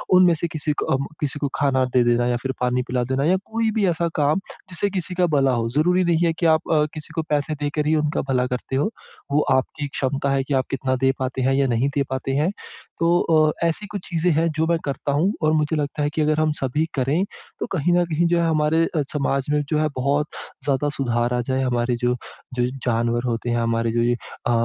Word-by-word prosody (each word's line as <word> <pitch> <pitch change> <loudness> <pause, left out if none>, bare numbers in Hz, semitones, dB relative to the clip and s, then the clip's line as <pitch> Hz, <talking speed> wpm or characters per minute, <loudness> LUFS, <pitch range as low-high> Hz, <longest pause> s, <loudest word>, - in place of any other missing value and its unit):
उनमें 180 -1 +6
से 170 - +1
किसी 155 -2 -2
को - - -1
अम, 135 +1 -2 0.2
किसी 145 0 -1
को 145 - 0
खाना 130 -2 +2
दे 125 -1 +5
देना 120 0 +2
या 120 -1 +1
फिर 135 0 -2
पानी 125 0 +1
पिला 125 0 0
देना 135 +1 +1
या 185 +4 +4
कोई 225 0 0
भी 215 -3 +2
ऐसा 170 0 +1
काम, 150 +4 +2 0.3
जिससे 185 +3 0
किसी 185 -2 -3
का 180 - +3
भला 135 -2 +3
हो। 115 -1 0
ज़रूरी 175 +8 +2
नहीं 170 0 +2
है 165 - +3
कि 170 - +1
आप 160 0 +3
अ, 150 -1 +4
किसी 155 0 -9
को 160 - +1
पैसे 150 +1 0
देकर 150 +1 -2
ही 160 - +3
उनका 150 0 0
भला 125 -1 +2
करते 125 +1 -4
हों। 140 +9 +2 0.4
वो 150 - +3
आपकी 135 +2 0
क्षमता 140 +1 -1
है 135 -1 +1
कि 140 - -3
आप 130 -1 +2
कितना 130 -1 0
दे 135 - +5
पाते 130 0 -2
हैं 135 +1 +2
या 135 0 +2
नहीं 120 +3 +1
दे 140 - +2
पाते 130 0 -2
हैं। 150 +5 +2 0.5
तो 170 +1 +3
अ, 155 0 +2
ऐसी 200 +6 -2
कुछ 200 - -4
चीज़ें 175 0 +1
हैं, 160 +2 +2
जो 160 +1 0
मैं 170 - +2
करता 140 0 -2
हूँ 170 +8 +2
और 155 0 +3
मुझे 155 0 +1
लगता 150 0 -2
है 145 - +1
कि 155 - +1
अगर 155 0 +2
हम 155 0 +2
सभी 135 +4 0
करें, 140 +7 +1 0.4
तो - - -1
कहीं 175 +2 +2
न 175 - +3
कहीं 170 +1 +1
जो 170 0 +2
है, 165 - +2
हमारे 155 +1 +2
अ, 160 -2 -1
समाज 140 -2 0
में 150 0 +2
जो 155 - +1
है, 155 - +2
बहुत 140 +3 +1 0.4
ज़्यादा 140 +1 +1
सुधार 120 -2 0
आ 125 - +1
जाए। 130 0 +1
हमारे 120 -1 0
जो 125 - +2 0.4
जो 125 -1 +1 0.2
जानवर 120 +1 +1
होते 120 0 -2
हैं, 120 - +1
हमारे 115 0 0
जो 120 +1 +1
ये 120 +1 +2
अ, 120 - -6
145 Hz, 245 wpm, -22 LUFS, 130-160 Hz, 0.5 s, उनमें